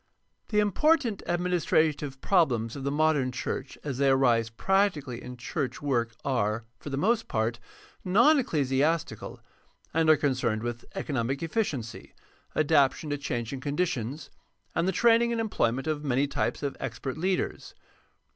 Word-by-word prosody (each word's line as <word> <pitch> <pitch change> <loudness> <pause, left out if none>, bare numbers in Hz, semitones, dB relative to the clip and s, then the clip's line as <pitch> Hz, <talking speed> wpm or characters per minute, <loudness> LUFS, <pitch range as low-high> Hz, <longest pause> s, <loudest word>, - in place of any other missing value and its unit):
— - - -48
The 210 - -1
important 235 - +2
administrative 160 -5 +1
problems 120 - +2
of 140 - -6
the 140 - 0
modem 145 -3 +2
church 130 +1 -4
as 135 -3 -4
they 140 -1 +4
arise 120 -4 +3
practically 150 - 0
in 125 0 -8
church 130 +3 -3
work 120 -6 -1
are, 115 -4 0
for - - -7
the 135 - -3
most 225 +8 +1
part, 115 +1 -1 0.4
non 240 +12 +5
ecclesiastical, 150 - 0 0.5
and 160 0 +2
are 155 - +7
concerned 125 -6 0
with 120 0 -4
economic 135 +1 -2
efficiency, 155 - -3 0.4
adaptation 150 -1 +2
to 145 - 0
changing 125 -2 -3
conditions, 140 -2 -2 0.4
and 170 +2 0
the - - +3
training 235 +4 +4
and 230 - -1
employment 135 - 0
of 155 -1 -2
many 135 0 +2
types 120 -2 -2
of 140 - -2
expert 125 +2 -4
leaders. 185 +4 -2
145 Hz, 145 wpm, -28 LUFS, 125-175 Hz, 0.5 s, are